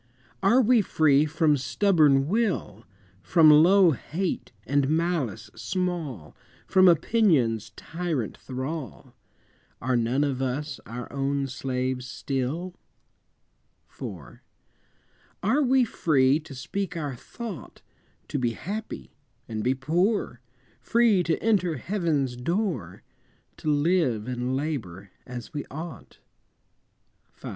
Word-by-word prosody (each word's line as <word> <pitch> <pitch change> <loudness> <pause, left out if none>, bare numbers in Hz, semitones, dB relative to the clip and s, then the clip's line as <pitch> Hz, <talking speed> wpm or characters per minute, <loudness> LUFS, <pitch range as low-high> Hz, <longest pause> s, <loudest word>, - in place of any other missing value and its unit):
Are 230 +7 +5
we 235 0 +5
free 155 -5 +3
from 155 -1 +2
stubborn 140 +1 +3
will, 185 - -1 0.4
From 160 - +6
low 175 +4 +6
hate 170 +6 -3
and 140 +2 +1
malice 155 - -1
small, 165 - -3 0.3
From 185 0 +5
opinion's 155 - +3
tyrant 160 - -3
thrall? 130 -1 -6 0.7
Are 130 +1 0
none 120 +4 +1
of 135 -3 -1
us 135 +2 -3
our 120 +1 -6
own 140 0 -1
slaves 130 -1 -3
still? 140 +8 -3 1.2
IV. - - -8 1.0
Are 290 - +3
we 260 -2 +4
free 140 - +2
to 150 -3 -11
speak 180 +7 -4
our 145 -5 -3
thought, 200 - -9 0.5
To 145 - -2
be 120 -2 0
happy, 195 - -6 0.3
and 110 -1 -4
be 130 +2 +2
poor, 165 - 0 0.4
Free 230 -5 +3
to 165 -2 0
enter 185 -7 +2
Heaven's 155 - -1
door, 130 - -2 0.5
To 155 - -3
live 145 - +1
and 125 +1 -2
labor 105 - -4 0.2
as 125 +1 -8
we 145 - -3
ought? 160 +4 -8 1.2
V. - - -8
145 Hz, 110 wpm, -26 LUFS, 125-180 Hz, 1.2 s, From